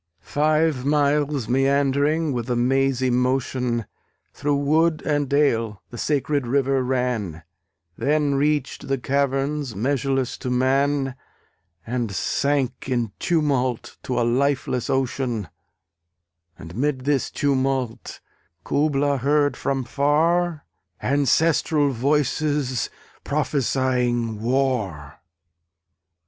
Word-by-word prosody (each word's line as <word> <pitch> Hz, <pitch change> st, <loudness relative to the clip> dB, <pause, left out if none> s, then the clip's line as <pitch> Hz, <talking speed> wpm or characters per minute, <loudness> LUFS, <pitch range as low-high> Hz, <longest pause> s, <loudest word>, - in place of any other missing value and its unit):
Five 155 Hz, -, +1 dB
miles 145 Hz, -2 st, +1 dB
meandering 140 Hz, +4 st, +2 dB
with 120 Hz, 0 st, -3 dB
a 125 Hz, -, +1 dB
mazy 130 Hz, +1 st, +1 dB
motion 125 Hz, -2 st, 0 dB, 0.5 s
Through 145 Hz, 0 st, 0 dB
wood 155 Hz, +3 st, +2 dB
and 145 Hz, -3 st, 0 dB
dale 115 Hz, -9 st, +1 dB
the 120 Hz, -, -8 dB
sacred 145 Hz, -2 st, 0 dB
river 135 Hz, +1 st, +1 dB
ran, 125 Hz, -10 st, -2 dB, 0.6 s
Then 145 Hz, 0 st, +1 dB
reached 145 Hz, 0 st, 0 dB
the 135 Hz, -, 0 dB
caverns 140 Hz, -1 st, -1 dB
measureless 135 Hz, +3 st, -1 dB
to 125 Hz, -, -4 dB
man, 135 Hz, +2 st, +1 dB, 0.7 s
And 120 Hz, -2 st, -2 dB
sank 140 Hz, 0 st, -1 dB
in 120 Hz, -4 st, 0 dB
tumult 135 Hz, -7 st, 0 dB
to 125 Hz, -1 st, -2 dB
a 120 Hz, -, +2 dB
lifeless 130 Hz, 0 st, 0 dB
ocean: 125 Hz, -, -1 dB, 1.1 s
And 80 Hz, +2 st, -10 dB
'mid 135 Hz, +2 st, 0 dB
this 140 Hz, -3 st, +1 dB
tumult 135 Hz, -4 st, -1 dB, 0.4 s
Kubla 145 Hz, -1 st, +1 dB
heard 145 Hz, +2 st, +2 dB
from 135 Hz, -1 st, -1 dB
far 155 Hz, +5 st, +1 dB, 0.3 s
Ancestral 145 Hz, +1 st, +2 dB
voices 140 Hz, 0 st, 0 dB, 0.3 s
prophesying 125 Hz, -5 st, 0 dB
war! 115 Hz, -, -1 dB
135 Hz, 95 wpm, -23 LUFS, 125-145 Hz, 1.1 s, meandering